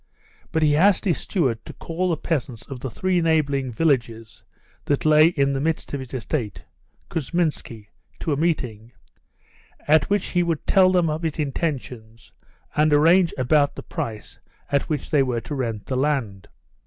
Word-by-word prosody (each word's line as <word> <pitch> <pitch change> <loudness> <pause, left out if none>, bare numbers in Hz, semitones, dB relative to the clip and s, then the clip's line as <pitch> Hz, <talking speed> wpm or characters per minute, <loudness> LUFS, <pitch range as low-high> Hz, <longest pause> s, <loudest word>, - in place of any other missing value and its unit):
But 160 -2 +1
he 150 -1 +4
asked 195 +6 +4
his 175 -5 +1
steward 130 - -1
to - - -10
call 180 +2 -3
the 165 - 0
peasants 130 -8 -3
of 135 -2 -8
the 130 - -5
three 185 +7 0
neighbouring 145 -5 +1
villages 115 -6 -1 0.4
that 145 +1 0
lay 155 +1 +6
in 140 -5 +1
the 135 - -1
midst 160 0 -2
of 140 - -2
his 130 -2 -9
estate 120 -3 -4 0.5
(Kousminski) 150 -9 -2 0.3
to 155 - -2
a - - +1
meeting, 125 -8 -2 0.9
at 150 -1 +4
which 205 -1 0
he 175 - +1
would 170 -3 -2
tell 185 -2 +5
them 180 -2 +2
of 155 +1 -2
his 160 -2 -2
intentions 130 -7 -4 0.4
and 150 +1 +3
arrange 165 +4 +5
about 145 +3 +2
the - - -8
price 110 -2 -6 0.3
at 140 -1 0
which 150 -2 -3
they 150 -3 +4
were 125 -3 -1
to 150 - -7
rent 115 -6 -3
the 130 - -3
land. 130 -8 -1
145 Hz, 170 wpm, -23 LUFS, 125-165 Hz, 0.9 s, lay